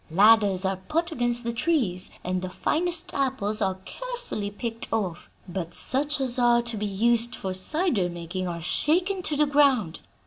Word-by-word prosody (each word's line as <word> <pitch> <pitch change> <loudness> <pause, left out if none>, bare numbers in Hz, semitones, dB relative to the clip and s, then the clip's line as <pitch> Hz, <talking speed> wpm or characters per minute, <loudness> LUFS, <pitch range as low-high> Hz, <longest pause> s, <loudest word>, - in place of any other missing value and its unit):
Ladders 200 +1 +5
are 190 0 0
put 330 - -2
against 240 -4 -1
the 235 0 -2
trees, 230 - 0
and 180 0 -2
the 185 - -4
finest 350 - -1
apples 245 -6 -1
are 190 -2 0
carefully - - -5
picked 225 +2 -5
off, 190 -6 -3 0.2
but 175 -1 -4
such 290 +3 +1
as 255 -2 0
are 240 -1 +4
to 235 -1 -4
be 210 0 -2
used 235 +4 +1
for 190 -1 -4
cider 215 - +1
making 175 +2 -5
are 170 -2 -5
shaken 360 - +2
to 305 -4 0
the 300 - +4
ground. 275 - +2
230 Hz, 170 wpm, -25 LUFS, 190-290 Hz, 0.2 s, Ladders